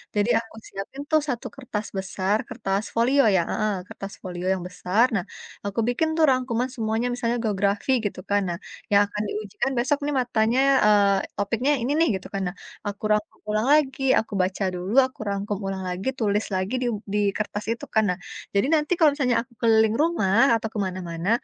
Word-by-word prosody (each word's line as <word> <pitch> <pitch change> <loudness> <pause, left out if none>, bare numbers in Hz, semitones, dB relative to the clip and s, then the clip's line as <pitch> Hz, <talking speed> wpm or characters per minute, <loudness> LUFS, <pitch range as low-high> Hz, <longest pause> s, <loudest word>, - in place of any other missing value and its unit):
Jadi 205 +2 +2
aku 225 -1 -11
siapin 195 +8 -7
tuh 310 -1 +5
1 245 -3 -2
kertas 230 -6 -5
besar, 190 +1 0
kertas 200 -3 -2
folio 255 +5 +4
ya, 180 - +4
heeh, 215 -1 0
kertas 195 0 -8
folio 180 -1 -5
yang 185 - -4
besar. 185 +5 +2
Nah, 180 - 0 0.4
aku 200 +3 -2
bikin 250 +6 +1
tuh 320 - +5
rangkuman 255 -1 0
semuanya 225 0 -1
misalnya 240 -1 -1
geografi 200 +3 0
gitu 200 - -3
kan. 205 0 +3
Nah, 170 - -2 0.3
yang 200 0 +6
akan 210 +1 -4
diujikan 215 +6 -3
besok 280 +5 +2
nih 295 - -1
matanya 235 0 +1 0.3
eee, 205 -2 +5 0.2
topiknya 230 +8 +1
ini 265 +5 0 0.2
gitu 185 - -11
kan. 195 - -1
Nah 195 - -18 0.3
aku 205 +1 -6
rangkum 210 0 -2
ulang 215 +3 +1
lagi, 280 -3 +2 0.2
aku 220 - -6
baca 185 +2 -1
dulu, 180 +4 -4
aku 260 - -10
rangkum 200 +1 -2
ulang 190 -1 -3
lagi, 180 +6 -4
tulis 210 -1 +1
lagi 185 +5 -2
di 245 - 0 0.3
di 210 - +2 0.2
kertas 210 -1 -3
itu 230 - -4
kan. 220 - +5
Nah, 180 - 0 0.4
jadi 200 - +3
nanti 300 +1 -1
kalau 315 -3 +5
misalnya 255 -5 +1
aku 255 - -26
keliling 220 -1 +4
rumah 235 - +3
atau 220 - -2
ke 215 - -3
mana-mana, 180 -1 -4
215 Hz, 190 wpm, -24 LUFS, 195-245 Hz, 0.4 s, yang